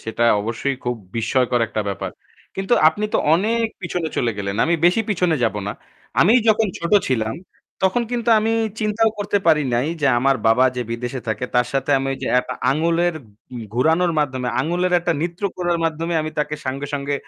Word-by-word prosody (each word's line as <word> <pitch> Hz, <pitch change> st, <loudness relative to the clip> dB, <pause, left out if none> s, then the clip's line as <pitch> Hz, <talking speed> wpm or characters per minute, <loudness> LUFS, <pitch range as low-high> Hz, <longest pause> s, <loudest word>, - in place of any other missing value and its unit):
সেটা 110 Hz, +1 st, -1 dB, 0.2 s
অবশ্যই 115 Hz, +5 st, -2 dB
খুব 125 Hz, 0 st, 0 dB, 0.2 s
বিস্ময়কর 125 Hz, +1 st, +1 dB
একটা 110 Hz, 0 st, -3 dB
ব্যাপার। 100 Hz, -, -4 dB, 0.5 s
কিন্তু 195 Hz, +3 st, -2 dB, 0.2 s
আপনি 205 Hz, +7 st, -3 dB
তো -, -, +4 dB, 0.2 s
অনেক 225 Hz, +6 st, +1 dB, 0.2 s
পিছনে 175 Hz, -2 st, -2 dB
চলে 120 Hz, -2 st, +1 dB
গেলেন। 100 Hz, 0 st, -3 dB
আমি 170 Hz, -, +2 dB
বেশি 180 Hz, +6 st, +4 dB
পিছনে 180 Hz, -4 st, +1 dB
যাবো 105 Hz, -2 st, -1 dB
না। 100 Hz, -, -2 dB, 0.5 s
আমি 195 Hz, -, +5 dB, 0.2 s
যখন 220 Hz, 0 st, +4 dB
ছোট 170 Hz, +2 st, -4 dB, 0.2 s
ছিলাম 110 Hz, -3 st, 0 dB, 0.5 s
তখন 190 Hz, +6 st, +2 dB
কিন্তু 240 Hz, -1 st, -2 dB
আমি 220 Hz, +1 st, 0 dB, 0.3 s
চিন্তাও 220 Hz, +1 st, +2 dB
করতে 205 Hz, 0 st, 0 dB
পারি 155 Hz, -2 st, +5 dB
নাই 125 Hz, +4 st, +1 dB
যে 140 Hz, -, +2 dB
আমার 135 Hz, +2 st, +2 dB
বাবা 115 Hz, +3 st, +5 dB
যে 125 Hz, -, -1 dB
বিদেশে 120 Hz, +2 st, -4 dB
থাকে 110 Hz, -, -2 dB
তার 125 Hz, 0 st, +3 dB
সাথে 135 Hz, +1 st, -1 dB
আমি 135 Hz, -, -3 dB
ওই 135 Hz, -, -6 dB
যে -, -, -2 dB
অ্যাপ 125 Hz, -, +2 dB, 0.2 s
আঙুলের 165 Hz, +4 st, +1 dB, 0.4 s
উম 120 Hz, -2 st, -6 dB
ঘোরানোর 160 Hz, +7 st, +2 dB
মাধ্যমে, 130 Hz, -4 st, -1 dB
আঙুলের 175 Hz, +5 st, 0 dB
একটা 175 Hz, 0 st, 0 dB
নৃত্য 170 Hz, +3 st, -4 dB
করার 175 Hz, -1 st, 0 dB
মাধ্যমে 165 Hz, +1 st, -2 dB
আমি 155 Hz, 0 st, -4 dB
তাকে 150 Hz, 0 st, -1 dB
সঙ্গে, 135 Hz, +2 st, -3 dB
সঙ্গে 140 Hz, 0 st, -2 dB
150 Hz, 190 wpm, -21 LUFS, 125-180 Hz, 0.5 s, আমি